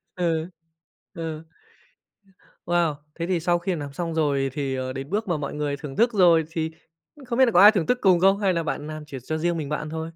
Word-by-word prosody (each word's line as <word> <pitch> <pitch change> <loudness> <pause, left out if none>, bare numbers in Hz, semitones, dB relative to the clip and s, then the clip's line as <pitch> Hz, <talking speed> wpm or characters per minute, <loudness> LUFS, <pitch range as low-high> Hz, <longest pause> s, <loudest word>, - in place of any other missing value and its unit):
Ừ. 165 -1 -1 0.6
Ừ. 160 -2 -5 1.2
Wow! 170 -3 +1 0.2
Thế 170 - -2
thì 180 -3 +1
sau 175 +1 +1
khi 180 0 -2
làm 145 -2 -6
xong 165 +1 -3
rồi 140 -4 +1
thì, 140 -3 -2
ờ, 130 0 -3
đến 135 +2 -6
bước 210 +2 -2
mà 170 -3 0
mọi 140 -1 -5
người 145 -1 -2
thưởng 140 -2 -8
thức 235 0 +3
rồi 170 -5 +5
thì, 160 -1 -2 0.4
ư, 290 - -15
không 240 +1 -2
biết 260 - +8
là 235 - +1
có 180 - +5
ai 210 +1 +10
thưởng 185 -7 0
thức 250 - +2
cùng 185 -3 +5
không 195 +2 +4
hay 195 -3 +2
là 165 -1 -1
bạn 150 -1 -4
làm 155 0 -7
chỉ 140 -2 -8
cho 155 +3 -3
riêng 170 +1 0
mình 150 -2 -4
bạn 150 - -1
ăn 155 - -6
thôi? 160 0 -4
165 Hz, 250 wpm, -24 LUFS, 150-180 Hz, 1.2 s, ai